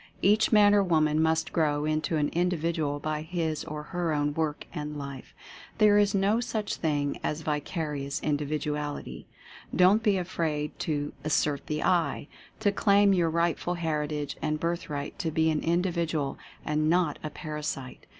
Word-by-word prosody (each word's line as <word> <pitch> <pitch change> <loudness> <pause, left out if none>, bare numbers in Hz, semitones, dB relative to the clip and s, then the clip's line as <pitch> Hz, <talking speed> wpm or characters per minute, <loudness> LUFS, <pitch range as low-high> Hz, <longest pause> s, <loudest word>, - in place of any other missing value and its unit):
Each 210 +3 +4
man 205 -2 +6
or 205 -1 +5
woman 155 -3 +2
must 160 0 +1
grow 150 -2 +1
into 155 +1 0
an 145 -1 +1
Individual 165 -4 0
by 155 +1 -2
his 160 -1 -2
or 150 -1 -6
her 175 -3 0
own 145 0 0
work 155 -1 -2
and 150 0 -5
life. 140 -2 -8 0.4
There 210 -1 +6
is 205 -1 +2
no 200 +3 +2
such 220 -3 -2
thing 145 -3 -1
as 150 +1 -2
vicarious 150 -2 -3
Indi 145 -1 0
viduality. 150 0 -3 0.5
Don't 190 +4 +5
be 210 -3 +2
afraid 160 -4 -2
to 145 -2 -2
"assert 150 -1 0
the 150 0 -2
I" 165 -6 +1 0.2
— - - -26
to 205 -2 +3
claim 200 0 +4
your 175 -3 +2
rightful 170 +1 0
heritage 150 -3 -2
and 155 -1 -1
birthright 155 -4 -3
to 165 - -1
be 160 0 +2
an 155 - 0
Indi 175 +3 +1
vidual, 160 -5 -1 0.3
and 155 +1 +1
not 170 -3 +2
a 155 - -3
Parasite. 150 -4 -6
155 Hz, 165 wpm, -28 LUFS, 150-175 Hz, 0.5 s, man